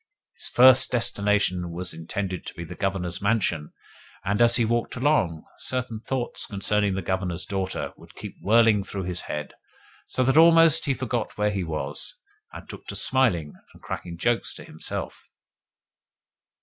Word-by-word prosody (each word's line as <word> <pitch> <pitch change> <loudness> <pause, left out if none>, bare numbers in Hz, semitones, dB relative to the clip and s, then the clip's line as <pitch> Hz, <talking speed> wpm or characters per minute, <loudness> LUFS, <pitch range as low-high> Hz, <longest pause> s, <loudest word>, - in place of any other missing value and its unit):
His - - -1
first 130 +1 +6
destination 100 -6 +1
was 85 +1 -3
intended 90 +3 -4
to - - -7
be 85 - -6
the 80 - -8
Governor's 95 -3 -2
mansion, 100 -8 0 0.5
and, 105 +3 0
as 120 0 +6
he 120 - +3
walked 120 +1 -1
along, 125 - +1 0.2
certain 125 -3 -3
thoughts 125 +1 -3
concerning 100 -1 0
the 95 - -3
Governor's 95 -2 -2
daughter 95 -1 -3
would - - -17
keep - - -8
whirling 110 -1 +4
through 95 -1 -5
his 90 -1 -3
head, 75 0 -4 0.5
so 130 - +1
that 135 +3 +2
almost 165 -1 +7
he 140 -3 +1
forgot 120 -2 -3
where 105 0 +1
he 100 -2 -2
was, 75 -3 -4 0.3
and - - -10
took - - -11
to - - -5
smiling 95 - +1 0.2
and - - -18
cracking 85 -1 -6
jokes 120 +6 0
to - - -9
himself. 80 - -7
100 Hz, 160 wpm, -25 LUFS, 90-120 Hz, 0.5 s, almost